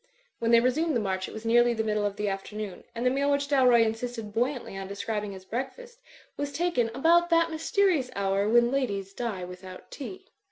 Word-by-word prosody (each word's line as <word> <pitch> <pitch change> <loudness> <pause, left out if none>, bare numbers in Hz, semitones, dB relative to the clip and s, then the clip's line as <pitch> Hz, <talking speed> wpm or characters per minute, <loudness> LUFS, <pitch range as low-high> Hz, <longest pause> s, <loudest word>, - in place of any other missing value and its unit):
"' - - -41
When 230 - 0
they 235 0 +7
resumed 300 +6 +1
the - - +3
march 190 -3 -2
it - - -9
was 220 +1 -8
nearly 240 +1 +4
the 220 - 0
middle 210 -1 0
of 200 - -5
the 210 0 -2
afternoon; 195 0 -5
and 235 +2 -3
the 250 - +4
meal 280 +2 +1
which 280 0 +1
Dalroy 255 -5 +5
insisted 225 -1 -4
buoyantly 245 -1 -1
on 195 0 -5
describing 205 0 -4
as 190 0 -12
breakfast 470 - -6 0.4
was 285 0 -3
tak 345 -2 -1
en 230 -1 +2
about 340 +5 +4
that 335 -1 +3
mysterious 320 -3 +1
hour 200 +1 +1
when 240 +1 +4
ladies 200 -8 -2
die 215 -5 -3
without 185 +1 -11
tea. 370 +7 -8
235 Hz, 210 wpm, -27 LUFS, 205-280 Hz, 0.4 s, they